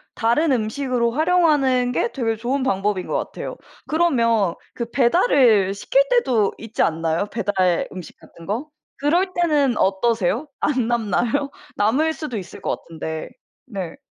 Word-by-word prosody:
다른 255 +7 +2
음식으로 240 +1 0
활용하는 295 -5 +2
게 240 - 0
되게 225 -4 -1
좋은 255 +4 -2
방법인 195 -4 0
것 - - -3
같아요. - - -5 0.3
그러면 230 - +2 0.2
그 235 -1 -5
배달을 240 - +3
시킬 - - +2
때도 255 - +2
있지 225 0 -4
않나요? 165 +4 0
배달 190 -5 0
음식 185 -3 -9
같은 165 +1 -15
거? 245 +10 -3 0.3
그럴 350 +6 +1
때는 295 -7 +2
어떠세요? 220 - +1
안 255 -6 +1
남나요? 240 +5 0 0.2
남을 275 +10 +2
수도 295 -9 -5
있을 185 - -10
것 - - -3
같은데. 160 -1 -5 0.4
네. 195 -8 -6
235 Hz, 290 characters per minute, -21 LUFS, 200-285 Hz, 0.4 s, 배달을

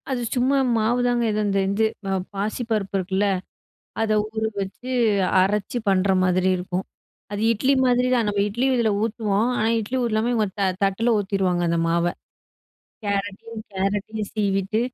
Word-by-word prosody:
அது 255 -2 -1
சும்மா 260 +3 +2 0.2
மாவுதாங்க, 240 +2 +1
ஏதோ 215 0 0
இந்த 195 -1 +1
இது 210 +3 +2 0.2
ப - - -4 0.3
பாசிப்பருப்பு 210 -1 -2
இருக்குல்ல, 190 +2 0 0.8
அத 225 -1 0
ஊற 220 +1 -5 0.2
வச்சு 200 +6 -6 0.5
அரைச்சு 205 +4 0
பண்ற 195 0 +2 0.2
மாதிரி 185 0 +2
இருக்கும். 180 +1 -3 0.5
அது 205 - -3
இட்லி 260 +5 +2
மாதிரி 250 0 +3
தான் 235 -3 +2
நம்ம 205 -1 0
இட்லி 240 +6 -1
இதில 230 -2 +2
ஊத்துவோம். 220 -1 0
ஆனா, 220 - +2
இட்லி 225 +4 -3
ஊத்தாம 225 0 0
இவங்க 220 -2 +2 0.4
தட்டில 220 +4 +2
ஊத்திருவாங்க 190 -3 0
அந்த 170 0 +1
மாவ. 170 +1 +1 1.0
கேரட்டையும் 205 +2 -3
கேரட்டையும் 205 +2 -2
சீவிட்டு 200 0 0
210 Hz, 140 wpm, -23 LUFS, 195-230 Hz, 1.0 s, மாதிரி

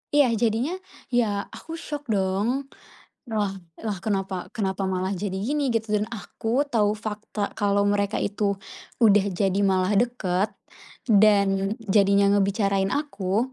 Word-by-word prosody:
iya 290 -2 +6
jadinya, 230 - 0 0.4
ya 240 - +5 0.3
aku 325 - -11
syok 295 -2 -5
dong, 205 +7 0 0.6
"Lah 210 -3 0 0.3
lah, 210 -3 -1
kenapa 195 -2 -2
kenapa 195 -2 -1
malah 185 +1 -1
jadi 190 0 -3
gini?" 275 +8 0
Gitu, 225 -2 -1
dan 210 0 +1
aku 230 +3 -2
tahu 215 -6 +1
fakta 210 -1 -4
kalau 200 -1 +1
mereka 205 0 +1
itu 200 0 -1 0.5
udah 205 -2 +6
jadi 195 +1 0
malah 190 -1 +2
deket 210 -5 0 0.6
dan 200 -2 +4
jadinya 200 -1 +4
ngebicarain 200 -1 +2
aku 225 -4 -1
205 Hz, 130 wpm, -25 LUFS, 195-225 Hz, 0.6 s, iya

